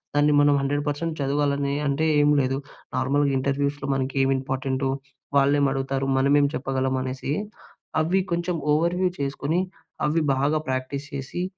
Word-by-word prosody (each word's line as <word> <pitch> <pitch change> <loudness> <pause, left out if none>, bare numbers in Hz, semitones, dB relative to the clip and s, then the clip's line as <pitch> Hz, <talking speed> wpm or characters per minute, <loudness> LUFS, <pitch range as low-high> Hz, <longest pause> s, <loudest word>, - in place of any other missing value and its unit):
దాన్ని 145 0 +4
మనం 145 0 +5
100% 145 +3 -1
చదవాలని 140 0 0
అంటే 140 +3 +1 0.2
ఏం 145 - +4
లేదు, 135 0 0 0.4
నార్మల్‌గా 140 +2 +2
ఇంటర్వ్యూస్‍లో 140 +1 -1
మనకి 135 +1 -2
ఏమి 135 0 +3
ఇంపార్టెంటో, 130 0 -2 0.5
వాళ్ళేమి 140 0 +4
అడుగుతారు? 135 0 -1
మనమేం 140 +2 +4
చెప్పగలం 130 0 -1
అనేసి, 130 +1 -4 0.7
అవి 175 +5 +2
కొంచెం 170 +1 0 0.2
ఓవర్‌వ్యూ 175 +4 +2
చేసుకొని, 140 +4 -1 0.5
అవి 160 +2 +1
బాగా 140 +3 +1
ప్రాక్టీస్ 130 +2 -3
చేసి, 140 +6 -4
140 Hz, 130 wpm, -24 LUFS, 135-145 Hz, 0.7 s, మనం